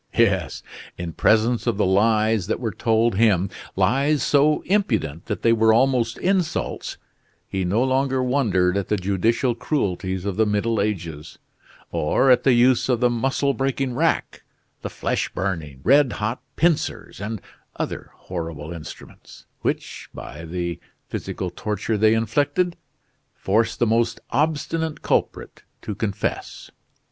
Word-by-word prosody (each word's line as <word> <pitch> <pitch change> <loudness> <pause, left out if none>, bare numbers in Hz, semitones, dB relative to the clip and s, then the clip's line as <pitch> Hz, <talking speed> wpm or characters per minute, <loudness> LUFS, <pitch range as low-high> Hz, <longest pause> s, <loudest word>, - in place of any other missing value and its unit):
Yes, - - +2 0.3
in 85 -2 -5
presence 115 +6 +2
of 115 -4 +1
the 105 - +2
lies 105 +1 +2
that - - -1
were 115 -3 -2
told 115 0 +2
him, 100 -4 +3 0.2
lies 135 +10 +2
so 150 +1 +3
impudent 115 - 0
that - - -4
they 115 - +5
were 110 -1 +4
almost 120 0 +2
insults, 185 -3 -1 0.5
he 95 -1 -2
no 100 +7 +1
longer 130 0 +1
wondered 105 -9 +2
at 100 - -2
the 105 - +1
judicial 105 +6 +1
cruelties 95 - -2
of 100 -1 -2
the 110 -1 +3
Middle 105 +1 +1
Ages, 85 -7 -4 0.5
or 130 - +2
at 125 - +5
the 135 - +4
use 125 +2 +4
of 125 -3 +2
the 125 0 +3
muscle 135 +3 0
breaking 135 -1 -1
rack, - - 0 0.4
the - - -4
flesh - - -2
burning, 80 -8 -3
red 140 0 +4
hot 110 +4 -3
pincers, 165 - 0
and 110 +1 -4 0.4
other - - -4
horrible 85 -3 -6
instruments, 80 -3 -11 0.2
which, - - -3
by 80 +3 -8
the 85 0 -3 0.3
physical 90 - -4
torture 105 +3 -2
they 110 +1 +4
inflicted, 145 - +1 0.6
forced 110 +3 +1
the 120 - +2
most 115 +1 +1
obstinate 155 +3 -1
culprit - - -1 0.2
to 105 - -4
confess. 100 -1 -4
110 Hz, 140 wpm, -23 LUFS, 95-130 Hz, 0.6 s, they